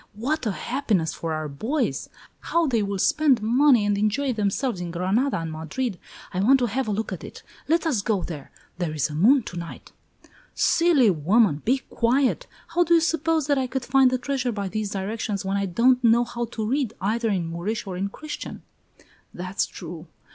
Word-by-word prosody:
What 260 +5 -2
a - - +1
happiness 215 - -1
for 165 - -4
our 155 -1 -2
boys! 220 - -2 0.3
How 335 0 +1
they 240 -7 +1
will 200 -1 -2
spend 295 +3 +3
money 245 0 +4
and 205 0 +2
enjoy 250 +6 +1
themselves 210 0 -1
in 175 - -4
Granada 190 +11 0
and 165 -1 -4
Madrid! 170 +7 -4 0.3
I 185 - -1
want 250 +8 +5
to 250 - +1
have 250 +2 -2
a - - 0
look 215 +2 -2
at - - -7
it. - - -10 0.2
Let 330 +2 +2
us 270 -11 +1
go 200 -3 0
there. 150 -5 -7 0.3
There 165 -4 -2
is 150 0 0
a - - -6
moon 235 - +4
to 175 - -8
night!" 170 -1 -8 0.6
"Silly 320 - +4
woman! 175 0 +2
Be 260 +2 +1
quiet! 260 - +1 0.2
How 350 +1 +3
do 340 0 +4
you - - +6
suppose 325 -1 +1
that 285 -1 +2
I 260 - -1
could 260 -1 -3
find 270 -2 +5
the 255 - 0
treasure 255 0 -2
by 200 -3 -3
these 215 0 -3
directions, 200 0 -3
when 195 +1 -1
I 200 0 0
don't 250 +7 +3
know 235 +1 +5
how 240 0 -4
to 220 -2 -4
read, 260 -2 -1
either 225 +4 0
in 185 -5 0
Moorish 175 +8 -3
or 190 -2 -5
in 195 +2 -2
Christian?" 300 +8 -7 0.7
"That's 185 +2 -2
true! 170 -1 -9
225 Hz, 200 wpm, -24 LUFS, 190-265 Hz, 0.7 s, you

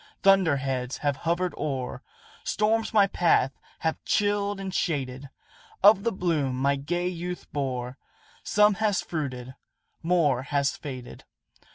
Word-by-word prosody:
Thunder 195 -7 +5
heads 130 -2 -3
have 145 -1 +2
hovered 170 +5 -1
o'er 135 -4 -3 0.4
Storms 220 +1 +1
my 210 -3 +5
path 170 -8 +2 0.3
have 160 0 -1
chilled 205 -1 +1
and 190 -1 -5
shaded; 140 -6 -2 0.5
Of 200 -1 +7
the 230 - +1
bloom 160 - 0
my 140 +2 +2
gay 175 +6 -2
youth 180 0 -5
bore, 130 -2 -3 0.4
Some 210 0 +4
has 205 -4 +2
fruited 130 -6 -4 0.5
more 160 -7 +2
has 140 0 0
faded." 130 -4 -8
160 Hz, 130 wpm, -26 LUFS, 135-190 Hz, 0.5 s, Of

